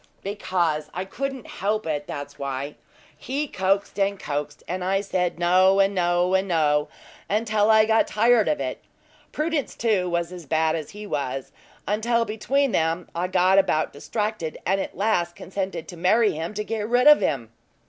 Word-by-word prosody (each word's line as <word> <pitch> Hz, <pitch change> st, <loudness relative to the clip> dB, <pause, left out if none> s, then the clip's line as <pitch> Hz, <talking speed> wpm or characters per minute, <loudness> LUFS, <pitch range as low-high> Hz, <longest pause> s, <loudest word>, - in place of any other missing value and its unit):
"Because 175 Hz, -6 st, -1 dB
I 185 Hz, +1 st, -3 dB
couldn't 270 Hz, +4 st, -5 dB
help 215 Hz, +2 st, -2 dB
it 150 Hz, -2 st, -3 dB
that's 145 Hz, 0 st, -7 dB
why. 140 Hz, +1 st, -4 dB, 0.4 s
He 285 Hz, +3 st, -3 dB
coaxed, 195 Hz, -1 st, -1 dB
and 200 Hz, 0 st, +1 dB
coaxed; 145 Hz, 0 st, -4 dB
and 180 Hz, +1 st, -3 dB
I 195 Hz, +2 st, +1 dB
said 180 Hz, -4 st, -1 dB
no, 185 Hz, +3 st, +4 dB
and 195 Hz, +1 st, +3 dB
no, 175 Hz, 0 st, +1 dB
and 190 Hz, +1 st, +2 dB
no, 150 Hz, -4 st, +2 dB, 0.4 s
until 215 Hz, 0 st, +1 dB
I 220 Hz, 0 st, +6 dB
got 220 Hz, 0 st, +3 dB
tired 225 Hz, 0 st, +3 dB
of 300 Hz, -, +1 dB
it. -, -, -4 dB, 0.5 s
Prudence, 305 Hz, -2 st, -2 dB
too, 205 Hz, -6 st, +1 dB
was 170 Hz, 0 st, -1 dB
as 175 Hz, -4 st, -9 dB
bad 160 Hz, +2 st, +2 dB
as 155 Hz, -3 st, -5 dB
he 210 Hz, +1 st, -9 dB
was, 135 Hz, -7 st, -3 dB, 0.4 s
until 230 Hz, +3 st, +1 dB
between 255 Hz, +6 st, 0 dB
them 165 Hz, 0 st, 0 dB
I 175 Hz, +2 st, -1 dB
got 185 Hz, +1 st, +4 dB
about 155 Hz, -5 st, +1 dB
distracted, 210 Hz, +1 st, -3 dB
and 195 Hz, +2 st, +1 dB
at -, -, -6 dB
last 175 Hz, -5 st, 0 dB
consented 185 Hz, -4 st, -5 dB
to 175 Hz, -, -9 dB
marry 210 Hz, +6 st, +3 dB
him 165 Hz, +6 st, -5 dB
to 210 Hz, -, -2 dB
get 215 Hz, 0 st, -3 dB
rid 245 Hz, +2 st, +3 dB
of 300 Hz, 0 st, +8 dB
him." 120 Hz, -6 st, -1 dB
190 Hz, 175 wpm, -24 LUFS, 165-215 Hz, 0.5 s, of